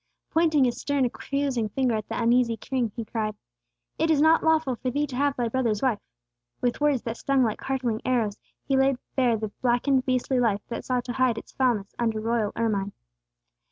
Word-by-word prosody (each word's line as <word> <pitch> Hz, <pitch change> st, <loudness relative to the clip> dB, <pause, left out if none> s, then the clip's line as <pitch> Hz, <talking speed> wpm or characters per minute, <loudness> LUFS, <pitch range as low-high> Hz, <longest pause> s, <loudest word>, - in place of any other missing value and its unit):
Pointing 315 Hz, -3 st, +3 dB
his 245 Hz, -2 st, 0 dB
stern, 285 Hz, -2 st, +1 dB
accusing 260 Hz, -2 st, -2 dB
finger 255 Hz, +2 st, 0 dB
at 215 Hz, -2 st, -3 dB
the -, -, -3 dB
uneasy 235 Hz, 0 st, +3 dB
king, 245 Hz, -1 st, -2 dB
he 230 Hz, -, -4 dB
cried, 215 Hz, -1 st, -3 dB, 0.6 s
"It 320 Hz, +1 st, +2 dB
is 310 Hz, -3 st, +4 dB
not 315 Hz, +2 st, +5 dB
lawful 315 Hz, -5 st, +2 dB
for 255 Hz, -, -2 dB
thee 290 Hz, +4 st, 0 dB
to 265 Hz, -4 st, -8 dB
have 280 Hz, +1 st, +1 dB
thy 240 Hz, -1 st, -1 dB
brother's 230 Hz, -3 st, 0 dB
wife!" 245 Hz, -6 st, +2 dB, 0.6 s
With 245 Hz, +3 st, -1 dB
words 290 Hz, -4 st, +2 dB
that 230 Hz, 0 st, -4 dB
stung 275 Hz, -2 st, +2 dB
like 220 Hz, -3 st, -1 dB
hurtling 255 Hz, -4 st, -2 dB
arrows, 225 Hz, -5 st, 0 dB, 0.3 s
he 270 Hz, -, +2 dB
laid 270 Hz, 0 st, +3 dB, 0.2 s
bare 245 Hz, -4 st, +3 dB
the 215 Hz, 0 st, -4 dB
blackened, 255 Hz, +2 st, +2 dB
beastly 255 Hz, 0 st, +1 dB
life 210 Hz, -4 st, +1 dB
that 235 Hz, -, -5 dB
sought 250 Hz, -2 st, -1 dB
to 245 Hz, -, -4 dB
hide 255 Hz, -3 st, +2 dB
its -, -, -8 dB
foulness 235 Hz, -7 st, 0 dB
under 225 Hz, -2 st, 0 dB
royal 225 Hz, -1 st, 0 dB
ermine. 205 Hz, -4 st, -1 dB
245 Hz, 195 wpm, -26 LUFS, 225-270 Hz, 0.6 s, not